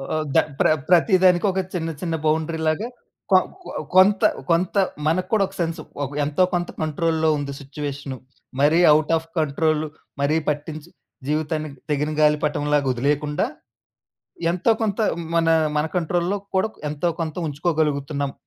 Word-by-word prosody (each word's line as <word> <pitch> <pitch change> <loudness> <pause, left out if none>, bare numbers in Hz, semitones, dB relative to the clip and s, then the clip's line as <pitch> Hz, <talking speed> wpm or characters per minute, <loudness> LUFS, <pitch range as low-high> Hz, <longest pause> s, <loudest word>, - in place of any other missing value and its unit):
ఆహ్, 155 - 0
ద - - +6 0.2
ప్ర - - +4 0.2
ప్రతిదానికి 180 0 +4
ఒక 190 - -2
చిన్న 165 -2 -2
చిన్న 165 -2 -1
బౌండరీ 160 +1 0
లాగా, 180 +9 0 0.4
కొ 185 - +8 0.3
కొ - - -10 0.3
కొంత 195 +2 +6 0.3
కొంత 180 +4 +1 0.3
మనకు 180 +3 0
కూడా 205 -2 +4
ఒక 195 - -15
సెన్సు. 165 -1 -2 0.2
ఒక 135 - -3 0.2
ఎంతో 150 +5 +2
కొంత 175 0 -1
కంట్రోల్‌లో 160 +1 +1
ఉంది 140 -1 -4
సిట్యుయేషను. 140 -1 -6 0.4
మరీ 155 +4 +4
అవుట్ 155 +1 +2
అఫ్ 165 +1 -8
కంట్రోల్ 155 +1 +1 0.4
మరీ 150 +3 +2
పట్టించి 150 +2 -4 0.4
జీవితాన్ని 155 0 -1 0.2
తెగిన 150 +1 0
గాలి 150 0 +5
పటంలాగా 145 -1 +1
ఒదిలేయకుండా, 145 +4 0 1.1
ఎంతో 185 +6 +1
కొంత 205 -2 -1 0.4
మన 165 0 +3 0.3
మన 150 - +2
కంట్రోల్‌లో 175 +3 0 0.2
కూడా 205 +4 +2 0.2
ఎంతో 150 +4 -1
కొంత 160 0 -3
ఉంచుకోగలుగుతున్నాం 145 -2 -1
155 Hz, 140 wpm, -22 LUFS, 150-175 Hz, 1.1 s, కొ